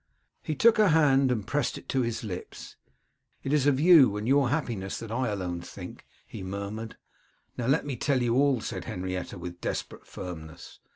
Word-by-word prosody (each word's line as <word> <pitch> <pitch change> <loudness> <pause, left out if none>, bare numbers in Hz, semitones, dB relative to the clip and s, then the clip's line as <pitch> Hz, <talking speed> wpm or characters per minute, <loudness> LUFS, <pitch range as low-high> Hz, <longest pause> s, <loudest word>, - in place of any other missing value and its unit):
He 155 - -3
took 230 +9 +5
her 215 - +6
hand 140 -5 +4
and 110 -5 -1
pressed 145 +2 -1
it - - -12
to 135 - +1
his 115 -2 -2
lips. 90 -4 -7 0.7
'It 135 - -1
is 145 -2 +3
of 135 -2 +3
you, 150 - +7
and 105 - -4
of - - -1
your 135 -2 +4
happiness 120 -10 -2
that 115 -2 -7
I 130 +3 0
can 105 - -1
alone 90 -3 -3
think,' 85 - -10 0.2
he - - -9
murmured. 100 +4 -5 0.6
'Now 120 - -3
let 145 +4 +2
me 135 -4 -4
tell 140 +2 +1
you 120 -1 +1
all,' 135 -2 +3
said - - -5
Henrietta, 90 +1 -4
with 90 0 -8
desperate - - -4
firmness. 80 -3 -9
120 Hz, 195 wpm, -28 LUFS, 95-140 Hz, 0.7 s, you